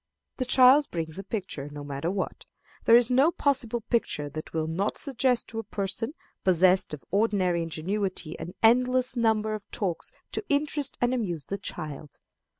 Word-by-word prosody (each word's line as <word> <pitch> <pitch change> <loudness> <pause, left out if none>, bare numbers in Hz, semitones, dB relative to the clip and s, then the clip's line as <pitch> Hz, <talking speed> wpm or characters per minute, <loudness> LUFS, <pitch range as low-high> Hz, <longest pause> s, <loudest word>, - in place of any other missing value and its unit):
The 255 - -1
child 260 +3 +6
brings 160 0 -4
a - - -5
picture, 185 -9 -5
no 145 0 -7
matter 145 +3 -3
what. 190 0 -4 0.4
There 230 - +7
is 240 +1 +5
no 270 +5 +5
possible 265 -7 0
picture 210 -11 -1
that 155 +2 -7
will 160 -1 -1
not 175 +6 -1
suggest 260 -3 +1
to 225 - -4
a - - -4
person 210 - -3 0.3
possessed 185 -2 +4
of 140 - -18
ordinary 195 -4 +2
ingenuity 170 +1 -3
an 175 +4 -7
endless 250 +2 +4
number 220 -2 +1
of 215 -2 -7
talks 185 -5 -3 0.2
to - - -3
interest 290 -1 0
and 245 +1 +2
amuse 175 - -2
the 200 - -4
child. 150 -5 -7
205 Hz, 165 wpm, -27 LUFS, 170-245 Hz, 0.4 s, There